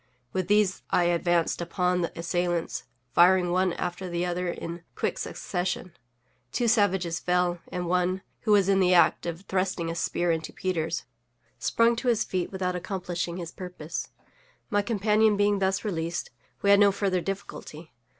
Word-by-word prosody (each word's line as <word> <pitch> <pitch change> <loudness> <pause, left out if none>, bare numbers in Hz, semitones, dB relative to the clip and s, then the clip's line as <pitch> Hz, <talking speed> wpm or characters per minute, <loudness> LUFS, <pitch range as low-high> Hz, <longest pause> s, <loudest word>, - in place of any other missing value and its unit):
With 185 -2 -1
these 205 -1 +3
I 180 - +3
advanced 175 0 +1
upon 180 +1 0
the 170 - -1
assailants, 175 0 -1 0.3
firing 180 +2 +5
one 185 0 +2
after 180 +1 -4
the 175 0 -1
other 180 0 -2
in 170 0 -5
quick - - -1
succession. 180 -1 -3 0.6
Two 240 - 0
savages 190 -7 +2
fell, 180 -1 +1
and 180 0 -3
one, 180 +2 0 0.2
who 215 - -1
was 200 -2 +5
in 195 -1 +4
the 180 -1 +4
act 175 - +4
of 170 +1 -4
thrusting 185 -3 -1
a - - -5
spear 175 +1 0
into 160 -1 -2
Peters, 165 -3 -2 0.6
sprung 230 - +3
to 250 - -3
his 235 -3 +3
feet 185 -2 -2
without 185 -2 -2
accomplishing 180 -1 -3
his 170 -2 -6
purpose. 180 -4 -6 0.6
My 205 0 +3
companion 215 0 +2
being 205 0 +3
thus 190 +2 0
released, 170 -3 -2 0.3
we 200 - +5
had 200 - +7
no 205 -1 +6
further 190 -2 0
difficulty. 170 -5 -7
180 Hz, 160 wpm, -27 LUFS, 175-195 Hz, 0.6 s, had